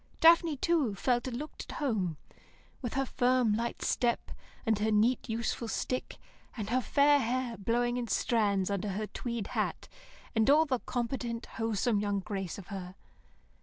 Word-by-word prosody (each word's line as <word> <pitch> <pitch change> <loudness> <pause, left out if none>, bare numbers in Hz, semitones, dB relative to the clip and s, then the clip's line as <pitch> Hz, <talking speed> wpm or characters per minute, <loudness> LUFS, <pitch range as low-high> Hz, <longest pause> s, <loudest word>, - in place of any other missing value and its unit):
Daphne, 330 -2 +6
too, 285 -8 +1
felt 240 +4 +1
and 240 -2 -3
looked 300 +4 -6
at - - -8
home, 205 - -1 0.6
with 245 -3 -4
her 270 0 +1
firm, 250 -3 +2
light 235 +2 -2
step, 240 -1 0 0.3
and 220 -2 +2
her 215 +1 +1
neat, 220 +4 +2
useful 230 +1 -2
stick, 255 +3 -3 0.4
and 215 -1 -4
her 255 +1 +3
fair 285 +3 +4
hair 245 -1 -1
blowing 240 +4 0
in 245 -1 -2
strands 205 -5 +1
under 200 +1 -1
her 205 +3 -2
tweed 235 0 -4
hat, - - -1 0.5
and 220 +2 +3
all 305 +3 +6
the 260 -4 0
competent, 240 -1 -3
wholesome 225 0 0
young 205 -1 0
grace 195 -3 -4
of 195 0 -10
her. 185 -2 -6
235 Hz, 165 wpm, -31 LUFS, 210-255 Hz, 0.6 s, Daphne